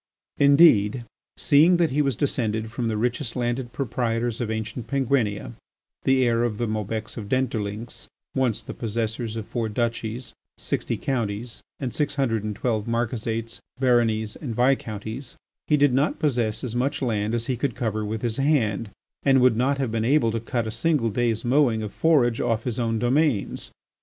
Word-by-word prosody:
Indeed 135 -6 +5 0.3
seeing 160 +5 +5
that 170 -4 +2
he 145 +3 +2
was 135 -4 +1
descended 110 -4 -1
from 120 0 -2
the 110 -1 -1
richest 120 0 -1
landed 120 0 -2
proprietors 120 -2 -1
of 115 - -2
ancient 110 +1 -4
Penguinia, 125 - 0 0.5
the 130 -1 +4
heir 115 0 +2
of 115 -3 -1
the 120 - -1
Maubecs 110 0 -3
of 105 -3 -6
Dentdulynx, 115 -4 -2 0.3
once 130 -5 0
the - - -7
possessors 115 0 -3
of 110 -2 -4
four 115 -1 -2
duchies, 115 +1 -3 0.2
sixty - - -2
counties, 115 -2 -3 0.2
and 130 -4 -3
six 145 -1 -1
hundred 115 -6 0
and 105 -1 -3
twelve 110 -1 -1
marquisates, 115 -1 -2 0.2
baronies, 115 -4 +2
and 125 -7 -5
viscounties, 120 -1 -1 0.3
he 150 - +4
did 145 -2 +4
not 140 +4 +1
possess 120 -7 0
as 120 -2 -4
much 135 +3 0
land 110 -2 0
as 115 -1 -2
he 130 - -1
could 125 -1 -2
cover 110 -2 -2
with 110 +2 -4
his 115 -2 -1
hand, 115 -7 +1 0.3
and 135 -1 +4
would 125 -2 +5
not 135 +4 +1
have 130 -5 -1
been 110 -1 -1
able 125 -1 +3
to 115 - -1
cut 120 +1 -2
a 110 - -3
single 120 0 +1
day's 115 0 0
mowing 120 -4 +3
of 105 - -6
forage 130 -8 +3
off 115 0 0
his 125 -1 -3
own 115 -1 0
domains. 125 0 0
120 Hz, 175 wpm, -24 LUFS, 110-130 Hz, 0.5 s, Indeed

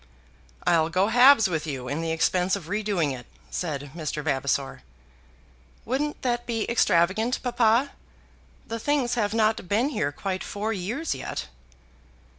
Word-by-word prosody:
"I'll 160 -1 +3
go 185 +4 +2
halves 245 -1 +7
with 160 -3 -2
you 130 -4 -4
in 145 +5 -2
the 165 - -2
expense 180 +3 +1
of 180 -5 -8
redoing 200 -7 0
it," 125 -1 -11 0.2
said 145 -5 -4
Mr. 155 -2 -4
Vavasor. 140 - -1 1.0
"Wouldn't 290 +5 -2
that 240 -1 -1
be 225 -2 -1
extravagant, 220 +2 +2
papa? 240 +2 +2 0.7
The 230 0 -5
things 275 -1 +1
have 220 -3 0
not 215 -4 +1
been 230 +7 +2
here 155 - -1
quite 190 +5 -4
four 215 +2 -3
years 225 - -2
yet." - - -5
205 Hz, 140 wpm, -26 LUFS, 160-235 Hz, 1.0 s, halves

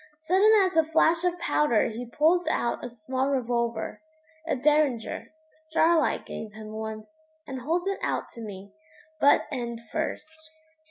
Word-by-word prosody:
Sudden 385 +5 +5
as 370 - -2
a 320 - +5
flash 320 +1 +2
of 355 -1 +1
powder 295 -10 +2
he 235 +2 -7
pulls 320 +6 +2
out 240 -6 0
a 245 - -4
small 255 +4 -2
revolver 235 -4 -1 0.5
a - - +1
Derringer 280 -3 +1 0.4
Starlight 325 0 +2
gave 215 -2 -7
him 215 0 -9
once, 220 +8 -7 0.2
and 265 -1 -6
holds 335 +7 -1
it 395 0 -1
out - - -1
to 230 - -10
me, 200 -2 -8 0.5
butt 285 - +5
end 235 -4 -4
first. 315 0 -5
275 Hz, 150 wpm, -27 LUFS, 230-320 Hz, 0.5 s, Sudden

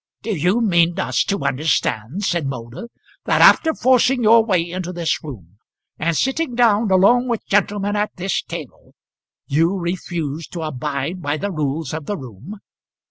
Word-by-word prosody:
"Do 215 -1 -2
you 180 +9 +1
mean 175 -5 +2
us - - +1
to 200 - -2
understand," 135 - -1
said 170 -6 0
Moulder, 125 - -7 0.4
"that - - +2
after 320 - +6
forcing 255 0 +3
your 225 +1 +6
way 185 -6 0
into 180 0 -5
this 170 -2 -2
room, 105 - -11 0.4
and 165 0 0
sitting 270 0 -1
down 225 -3 +3
along 220 +7 +4
with 235 -3 -2
gentlemen 205 0 0
at 210 0 -1
this 190 +2 -2
table, - - -10 0.5
you 165 +6 +1
refuse 170 -4 -4
to 170 - -7
abide 150 +3 -4
by 145 -1 -1
the 200 +5 -3
rules 150 -2 -3
of 155 -2 -6
the 205 - -2
room?" 130 - -10
175 Hz, 160 wpm, -20 LUFS, 150-210 Hz, 0.5 s, after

